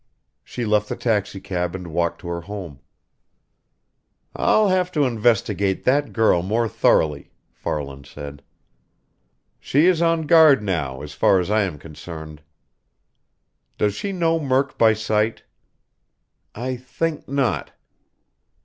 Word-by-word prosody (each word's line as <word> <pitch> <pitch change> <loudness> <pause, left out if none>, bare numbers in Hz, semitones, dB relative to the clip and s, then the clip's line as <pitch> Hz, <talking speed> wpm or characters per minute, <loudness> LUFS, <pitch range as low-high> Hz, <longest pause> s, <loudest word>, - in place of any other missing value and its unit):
She 120 - -5
left 105 -1 +1
the - - -2
taxicab 95 -5 -2
and 90 -2 -7
walked 85 0 -1
to - - -9
her 85 0 -3
home." 90 -7 -8 1.6
"I'll 215 -2 +3
have 185 -1 +1
to 150 - +2
investigate 105 -5 +1
that 145 +3 +2
girl 110 -6 +3
more 110 +6 0
thoroughly," 75 -7 +1 0.2
Farland 70 -2 -5
said. 70 -1 -9 1.2
"She 145 +5 +2
is 180 -2 +3
on 165 -1 +2
guard 155 -6 +6
now, 70 -9 -2
as 75 0 -8
far 95 +7 +3
as 90 +2 -2
I 110 0 +3
am 95 -7 -2
concerned." 80 0 -10 1.4
"Does 105 -1 +1
she 200 - -4
know 165 -3 +1
Murk 135 -2 0
by 110 -1 +5
sight?" 110 0 -1 1.1
"I 125 +3 -3
think 145 +6 -4
not." 135 -2 -1
105 Hz, 125 wpm, -22 LUFS, 85-135 Hz, 1.6 s, guard